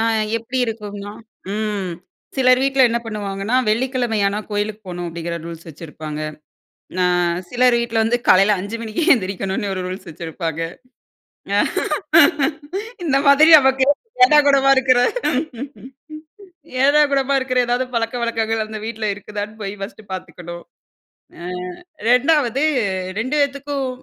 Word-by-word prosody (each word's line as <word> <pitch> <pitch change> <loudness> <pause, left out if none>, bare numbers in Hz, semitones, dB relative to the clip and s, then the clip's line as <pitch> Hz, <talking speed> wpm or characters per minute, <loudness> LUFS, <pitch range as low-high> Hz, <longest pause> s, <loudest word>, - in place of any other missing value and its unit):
ஆங் 225 -1 +1
எப்டி 245 +3 -4
இருக்கும்னா 205 -2 -6 0.4
ம். 210 -4 -2 0.5
சிலர் 255 -1 +4
வீட்ல 270 -1 +3
என்ன 235 - 0
பண்ணுவாங்கனா, 205 0 -3
"வெள்ளிக்கிழமையான 225 -3 0
கோயிலுக்கு 205 +1 -2
போணும்," 175 -1 -5
அப்டிங்கற 170 0 -5
ரூல்ஸ் 165 0 -9
வச்சிருபாங்க. 155 -1 -8 0.8
அ - - +4 0.4
சிலர் 250 0 +3
வீட்ல 235 -1 -2
வந்து 235 +2 +1
காலையில 195 +3 +6
5 205 +4 -5
மணிக்கே 230 +9 -2
எந்திருக்கணும்னு, 195 -2 -2
ஒரு 185 - -3
ரூல்ஸ் 185 0 -7
வச்சிருபாங்க. 165 0 -5 2.4
இந்த 275 -4 +2
மாதிரி 290 +3 +7
நமக்கு 265 -1 +3 0.4
ஏடாகூடமா 280 -1 +5
இருக்கிற, 260 -1 +4 1.9
ஏடாகூடமா 280 -1 +3
இருக்கிற 255 -1 +1
எதாது 245 +2 0
பலக்கவழக்கங்கள், 230 -1 -1
அந்த 215 0 -6
வீட்ல 225 -1 -3
இருக்குதான்னு 205 +2 -7
போய் 195 0 -4
ஃபர்ஸ்ட்டு 200 +1 -9
பார்த்துக்கணும். 175 -2 -8 0.7
அ - - -10 0.7
2ஆவது 270 0 +3 0.6
2 260 +6 -2
பேத்துக்கும், 280 -1 -1
225 Hz, 110 wpm, -20 LUFS, 195-260 Hz, 2.4 s, மாதிரி